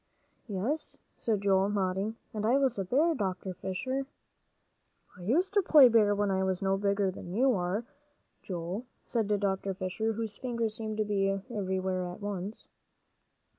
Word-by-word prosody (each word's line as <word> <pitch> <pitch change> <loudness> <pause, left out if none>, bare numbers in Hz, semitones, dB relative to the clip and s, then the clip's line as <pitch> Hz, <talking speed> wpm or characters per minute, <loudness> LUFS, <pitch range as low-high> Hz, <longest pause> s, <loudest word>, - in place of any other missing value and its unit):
"Yes," 225 +10 -2 0.2
said 215 -4 -1
Joel, 195 0 +3
nodding. 195 +1 -1 0.2
"And 210 -1 -3
I 235 +5 +4
was 265 -6 +1
a - - +1
bear, 290 - +3
Dr. 190 - -2
Fisher." 260 +10 -3 1.1
"I 180 - -13
used 325 - +1
to 405 - +5
play 295 -8 +8
bear 215 -3 +4
when 205 -1 +1
I 190 0 +1
was 190 -1 0
no 195 0 +1
bigger 200 -1 +1
than 180 0 -8
you 260 +3 +4
are, 190 +4 -1 0.6
Joel," 185 +6 -4 0.2
said 225 -4 0
Dr. 195 -1 -1
Fisher, 210 +4 -1
whose 220 -1 -4
fingers 235 -4 -1
seemed 220 -1 -4
to 215 - +1
be 200 -1 +1 0.2
everywhere 190 -3 -1
at 175 - -7
once. 205 0 -5
205 Hz, 160 wpm, -30 LUFS, 190-230 Hz, 1.1 s, play